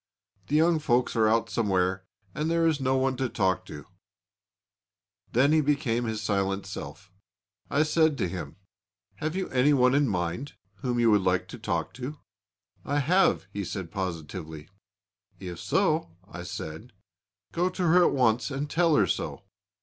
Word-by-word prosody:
The 145 - -1
young 160 +1 +4
folks 125 -5 +1
are 110 -1 +4
out 115 +1 +1
somewhere 95 -3 0 0.3
and 155 +1 -2
there 165 0 +2
is 160 -3 +2
no 130 0 +2
one 130 0 +1
to 130 -1 -1
talk 95 -3 0
to.' 75 - -9 1.5
Then 135 +5 +4
he 155 0 +4
became 120 -5 0
silent 100 -2 -1
himself. 95 0 -8 0.6
I 145 - +3
said 155 -1 +2
to - - 0
him: 85 -5 -6 0.6
'Have 155 - -3
you 190 - -2
any 130 +3 +3
one 125 -2 +4
in 140 0 +3
mind 90 - -2 0.2
whom 120 +4 -2
you 115 -1 +4
would 105 -2 +4
like 90 0 +1
to - - -9
talk - - -2
to?' 135 +4 -6 0.7
'I 145 - -1
have,' 175 - +3
he 100 - -3
said 90 -2 -5
positively. 80 -4 -5 0.7
'If 90 -3 -7
so,' 155 - 0
I 90 - -8
said, 90 +7 -7 0.6
'go 175 +2 +1
to 185 - -4
her 175 +1 +5
at - - +3
once 125 -2 +2
and 140 +1 -3
tell 165 +1 +2
her 105 - +4
so.' - - -3
120 Hz, 165 wpm, -27 LUFS, 95-150 Hz, 1.5 s, her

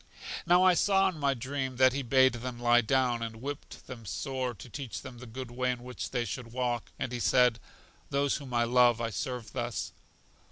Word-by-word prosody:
Now 175 +1 +6
I 185 -1 +6
saw 195 +2 +3
in 170 -4 -8
my 140 -1 +2
dream 130 +1 -3
that 130 0 +5
he 140 - -1
bade 130 0 +4
them 120 0 -5
lie 120 0 +5
down, 125 0 +1
and 115 -1 -4
whipt 140 +5 -7
them 125 -3 -9
sore, 130 +5 -3
to 115 - -11
teach 130 0 -6
them 125 -2 -9
the 125 - -10
good 125 +2 -7
way 125 +1 -1
in 125 -1 -2
which 125 0 -5
they 120 -2 -1
should 115 +2 -6
walk; 120 -1 -2
and 125 - -3
he 120 - -3
said: 125 -1 +4 0.5
Those 140 0 +1
whom 140 -3 -9
I 120 -1 +2
love 120 0 +4
I 115 -1 -2
serve 125 +1 -4
thus. 120 -1 -3
125 Hz, 210 wpm, -30 LUFS, 120-135 Hz, 0.5 s, Now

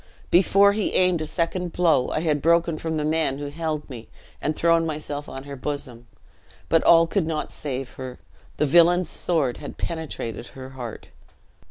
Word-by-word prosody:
"Before 195 +3 +5
he 210 -1 -1
aimed 180 -3 +3
a 155 - -3
second 175 +1 -2
blow, 160 -7 +2
I 155 - -1
had 150 -3 0
broken 170 0 +2
from 160 -1 -2
the 150 - -1
men 155 -3 +1
who 145 0 -5
held 155 0 -3
me, 120 -4 -10 0.3
and 155 +1 -1
thrown 165 0 +3
myself 150 -2 -4
on 135 - -7
her 140 0 -8
bosom; 130 -4 -5 0.6
but 165 - +3
all 165 0 +7
could 165 0 -1
not 155 -2 -3
save 135 -3 -4
her; 130 -1 -6 0.4
the 150 - +2
villain's 175 +3 +4
sword 150 -8 0
had - - -9
penetrated 140 -9 -5
her 130 0 -10
heart!" 125 -4 -8
155 Hz, 175 wpm, -24 LUFS, 140-170 Hz, 0.6 s, all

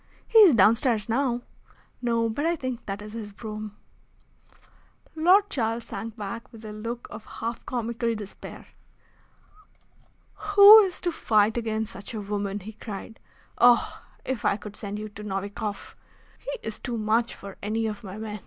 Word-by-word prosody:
"He 455 - +6
is 375 - +8
downstairs 225 +1 +4
now." 245 0 0 0.6
"No; 230 -2 +1
but 225 +6 -3
I 335 +1 +2
think 255 -5 -5
that 200 +1 -4
is 210 0 -9
his 220 -2 -6
brougham." 215 0 -7 1.4
Lord 370 +6 +5
Charles 230 - -1
sank 225 +1 -7
back 215 +2 -6
with 225 -1 -12
a 210 - -7
look 230 +3 -6
of 220 - -9
half 230 +1 -5
comical 235 -1 -2
despair. 205 -2 -9 1.7
"Who 415 +1 +9
is 385 -4 0
to 350 - 0
fight 215 -7 +2
against 220 -2 -2
such 200 +4 -8
a 215 - -3
woman?" 200 0 -3
he 215 +4 -9
cried. 215 +1 -8 0.4
"Oh! 245 0 +4 0.2
if 260 -4 -3
I 200 - +2
could 210 -1 -10
send 205 0 -5
you 215 0 -5
to 210 0 -10
Novikoff! 200 +1 -5 0.4
He - - -6 0.2
is 220 - -4
too 240 -3 -4
much 225 +2 +1
for 200 -1 -10
any 220 +2 -1
of 215 -1 -4
my 195 0 -8
men. 215 -1 -6
225 Hz, 160 wpm, -26 LUFS, 210-240 Hz, 1.7 s, Who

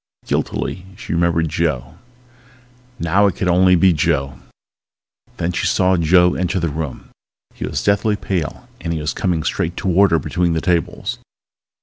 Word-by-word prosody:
Guiltily 95 0 -3
she - - -5
remembered 85 -1 +1
Joe, 80 -4 -2 1.0
now 100 +2 +3
it 95 - -1
could 95 - -2
only 90 +1 +5
be 90 +1 +4
Joe. 75 -4 0 1.0
Then 85 - -1
she - - -1
saw 95 0 +3
Joe 90 +1 +4
enter 90 +1 -1
the 85 -2 -1
room. 75 -2 -6 0.4
He - - -5
was - - -3
deathly 100 +1 +2
pale 90 -7 -4
and 85 0 -3
he 80 - -2
was 75 +1 -2
coming 85 -4 -1
straight 85 +3 -2
toward 95 +1 +3
her 85 - +3
between 85 +3 0
the 80 - 0
tables. 85 0 -1
85 Hz, 155 wpm, -19 LUFS, 80-95 Hz, 1.0 s, only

